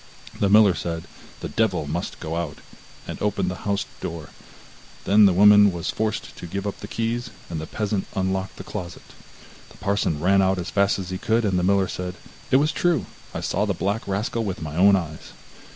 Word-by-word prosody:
The 100 - +2
miller 105 -2 +7
said: 85 0 -4 0.4
'The - - -4
Devil - - +1
must 80 +4 -4
go 80 +1 -4
out,' 85 -4 -3 0.5
and - - -6
opened 100 -3 0
the 95 - -6
house 100 -1 0
door; 80 -2 -6 0.8
then 105 +1 +6
the - - +4
woman 105 +2 +7
was 85 -2 -3
forced 110 -1 -3
to 85 - -7
give 100 +4 -4
up 100 - -4
the - - -7
keys, 120 +2 -2 0.2
and 80 -2 -3
the 80 - -6
peasant 105 -2 -2
unlocked 95 0 -1
the - - -7
closet. 85 -1 -7 0.7
The - - -17
parson 100 -6 0
ran 95 +4 +4
out 95 0 +2
as 90 -1 -4
fast 100 0 +2
as 95 -2 -5
he 95 - -3
could, 110 +1 +1
and 95 -3 +1
the - - -1
miller 95 0 +3
said: 90 0 -5 0.3
'It - - +3
was 150 +3 +2
true; 175 -2 +1 0.3
I - - -5
saw 100 +3 0
the 100 -3 -1
black 100 +6 -2
rascal 105 +4 -1
with 95 -4 -3
my 75 -1 -5
own 100 +3 +6
eyes. 85 -5 -5
95 Hz, 205 wpm, -24 LUFS, 90-105 Hz, 0.8 s, miller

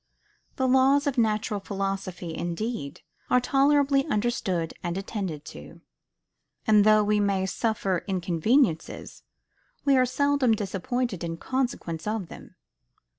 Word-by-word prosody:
The 260 - 0
laws 265 +2 +4
of 280 -3 0
natural 215 -2 0
philosophy, 195 -3 -4
indeed, 175 - -4 0.3
are 250 - +5
tolerably 275 +2 +3
understood 205 - -1
and 175 0 -3
attended 195 -7 -4
to; 75 - -12 0.8
and 210 -1 +5
though 215 0 +5
we 210 0 +2
may 200 -2 +1
suffer 195 -2 -1
inconveniences, 185 - 0 0.6
we 280 -1 +5
are 255 -1 +4
seldom 285 -2 +2
disappointed 205 +1 -3
in 165 -1 -4
consequence 240 -9 -3
of 215 -5 -2
them. - - -12
210 Hz, 120 wpm, -26 LUFS, 185-255 Hz, 0.8 s, are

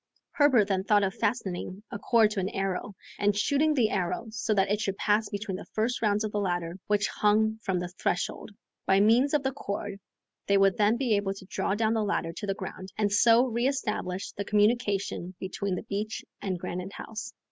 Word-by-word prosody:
Herbert 265 -9 +4
then 190 -2 0
thought 205 0 +3
of 190 -1 0
fastening 195 -3 -2
a 205 - -5
cord 220 -1 +4
to 210 - -2
an 190 0 -1
arrow, 195 0 -3 0.2
and 205 0 +2
shooting 295 +7 +2
the 230 -5 +2
arrow 185 +4 -1
so 220 0 -2
that 195 0 +2
it 210 +1 +1
should 195 -2 -2
pass 210 0 +1
between 205 -2 -4
the - - -10
first 225 +3 0
rounds 210 -1 +2
of 215 - -2
the 210 - -1
ladder 175 -2 -2
which 210 0 +2
hung 220 +1 +2
from 190 -4 -1
the 175 0 -2
threshold. 180 +3 -2 0.4
By 190 0 +5
means 240 +8 +4
of 290 - +1
the 265 0 -1
cord 200 -5 -5 0.5
they 200 - +4
would 195 -1 +4
then 215 +2 +3
be 245 -4 +2
able 195 -1 -1
to 195 - -11
draw 195 +1 -1
down 220 +1 +1
the 225 - +1
ladder 180 -5 -1
to 205 - -6
the 195 - 0
ground, 190 0 -7
and 210 -1 +1
so 230 +4 +5
re 240 0 0
establish 210 -8 -2
the 200 - -4
communication 205 -4 +1
between 190 0 -3
the - - -5
beach 215 0 -4 0.2
and 190 -2 -2
Granite 180 +2 -5
House. 220 0 -7
205 Hz, 210 wpm, -28 LUFS, 195-220 Hz, 0.5 s, By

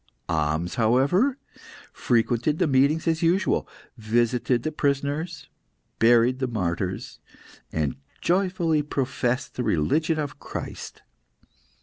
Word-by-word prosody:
Ahmes, 80 +2 -1
however, 140 - +3 0.6
frequented 120 +4 +1
the - - +2
meetings 145 +3 +2
as 160 -1 +1
usual, 175 +3 +1 0.3
visited 120 +2 +1
the 155 - -1
prisoners, 145 +2 -2 0.5
buried 120 +2 +4
the 130 - 0
martyrs, 95 -4 -3 0.5
and 75 -4 -1 0.2
joyfully 180 -4 +1
professed 135 -2 -2
the 125 - -3
religion 155 - +1
of 145 -4 -4
Christ. - - -7
130 Hz, 100 wpm, -25 LUFS, 115-155 Hz, 0.6 s, buried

